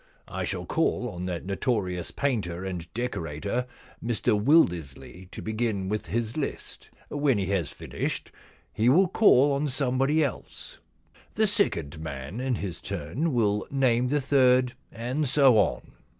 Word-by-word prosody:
I - - -3
shall - - -4
call - - 0
on 90 +1 -5
that 90 -1 -4
notorious 95 -3 -1
painter 95 -10 -2
and 90 -3 -5
decorator, 105 0 -3 0.4
Mr 115 0 +1
Wildersley, 90 - +1
to - - -8
begin 110 -3 -1
with 105 -3 -2
his 115 +5 -2
list. 150 - -5 0.2
When 145 -5 +1
he 100 - 0
has 90 -6 0
finished - - -4 0.4
he 115 +3 +3
will 180 +8 +5
call 145 - +5
on 140 +2 0
somebody 135 +3 +1
else. 140 - -6 0.6
The 220 - +3
second 85 - 0
man 80 - -6
in 130 -1 0
his 95 -6 -5
turn 130 - -2
will 105 -5 +1
name 125 -3 +2
the 145 +2 +1
third, 130 -2 +3 0.2
and 125 +5 -2
so 135 -5 +5
on. - - 0
120 Hz, 145 wpm, -27 LUFS, 95-135 Hz, 0.6 s, will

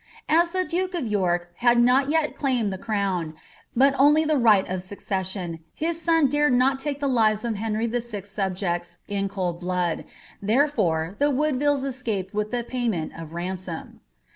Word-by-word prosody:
As 340 +2 +4
the 370 0 0
duke 365 +3 -2
of 325 -7 -2
York 175 -5 0
had 240 0 +4
not 255 +3 +4
yet 315 -1 +1
claimed 245 -8 0
the 190 - -6
crown, 195 -7 -2 0.4
but 270 +3 +5
only 295 +3 +5
the 310 0 +2
right 220 -7 +4
of 185 0 -3
succession, 190 -2 -3 0.2
his 330 +1 -2
son 325 -3 +4
dared 295 0 +2
not 265 +2 +3
take 285 0 -3
the 285 - 0
lives 220 -4 +2
of 235 - 0
Henry 220 +1 -1
Vl.'s 230 -4 -4
subjects 180 -3 -2
in 200 -1 -1
cold 180 -4 -3
blood; 180 -2 -1 0.4
therefore 205 - +1
the 290 +1 +3
Woodvillea 290 0 +1
escaped 225 -8 -3
with 210 0 -1
the 245 0 -2
payment 230 -10 -2
of 165 -1 -9
ransom. 175 -1 -5
220 Hz, 165 wpm, -25 LUFS, 185-275 Hz, 0.4 s, but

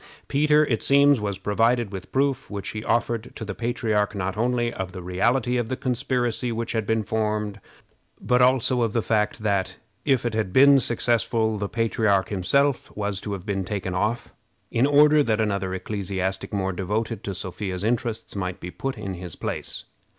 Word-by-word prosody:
Peter, 150 +1 +4
it 115 -6 -1
seems, 140 -2 +5
was 100 -2 -2
provided 115 +2 +1
with 95 -1 -8
proof, 135 0 0
which 100 -3 -5
he 110 0 -5
offered 115 0 -1
to 110 - -6
the 100 - -4
patriarch, 110 -3 -1
not 95 -1 -2
only 120 +1 0
of 95 -1 -5
the 90 - -6
reality 120 +7 +1
of 120 -2 -1
the 130 - -2
conspiracy 125 -2 -1
which 115 0 -3
had 110 -3 -1
been 110 -1 +1
formed, 105 -1 -1 0.6
but 125 0 +2
also 130 0 +3
of 115 -2 0
the 115 - +1
fact 105 -1 0
that, 95 -3 0 0.3
if 135 -4 +2
it 120 - -1
had 110 -4 -1
been 140 +4 +7
successful, 115 -2 +1
the 100 0 -2
patriarch 110 -3 +1
himself 130 +8 +1
was 100 -2 -2
to 100 0 -4
have 95 -2 -6
been 100 -2 -1
taken 95 -1 -3
off, 105 +6 -1 0.4
in 125 +4 +3
order 150 +1 +6
that 115 -6 +1
another 100 -3 0
ecclesiastic 95 0 -3
more 95 -2 -1
devoted 105 +4 -2
to 100 - -4
Sophia's 95 0 -4
interests 115 -1 -1
might 90 -2 -3
be 90 - -7
put 135 +4 -4
in 100 -3 -4
his 90 -2 -8
place. - - -4
110 Hz, 180 wpm, -24 LUFS, 100-120 Hz, 0.6 s, been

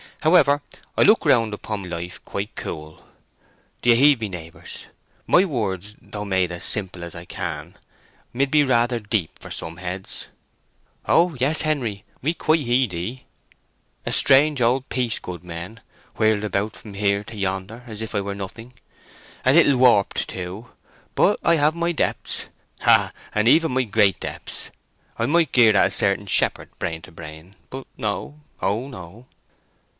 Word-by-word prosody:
However, 150 -3 +4 0.4
I - - +3
look 215 -3 +5
round 115 -7 +4
upon 105 -2 -5
life 85 +1 -6
quite 100 +2 -5
cool. 80 -1 -7 0.8
Do 120 - +1
you - - +6
heed 140 +1 +5
me, 110 - -2
neighbours? 85 -3 -9 0.4
My 185 - +5
words, 105 - -3
though 105 0 -7
made 95 -3 +1
as 85 -1 -5
simple 90 -4 0
as 85 - -7
I 85 +1 -9
can, - - -5 0.6
mid 135 +2 0
be 150 -1 +5
rather 120 -2 +2
deep 105 -5 -2
for - - -10
some 80 +1 -7
heads." 95 +1 -6 0.8
"O 170 -1 +4
yes, 145 +5 +3
Henery, 125 -10 -1 0.2
we 155 +5 +1
quite 155 -1 +2
heed 120 -4 +1
ye." 110 +10 -5 0.8
"A - - -2
strange 140 +1 +5
old 125 +3 +2
piece, 125 -4 -1
goodmen—whirled 95 +4 -4
about 105 0 -1
from 105 -3 -11
here 100 0 +1
to 115 - -10
yonder, 95 +4 -3
as 110 -3 -8
if 110 - -6
I 100 - 0
were 100 0 -4
nothing! 115 +5 -8 0.7
A 130 - +5
little 150 -4 +5
warped, 120 -6 +3
too. 95 +6 -7 0.4
But - - +3
I 170 - +4
have 150 +1 +2
my 170 0 0
depths; 165 - -1 0.4
ha, - - +4 0.2
and 105 +1 +2
even 160 +5 +5
my 130 +1 +1
great 105 -4 +2
depths! - - -6 0.5
I 115 - 0
might 165 +2 +2
gird 115 -4 +5
at - - +5
a - - -5
certain 100 0 0
shepherd, - - 0
brain 80 -1 -3
to - - -12
brain. 80 +3 -11
But 135 0 -7
no—O 110 +1 -3
no!" 105 0 -11
110 Hz, 160 wpm, -23 LUFS, 95-130 Hz, 0.8 s, you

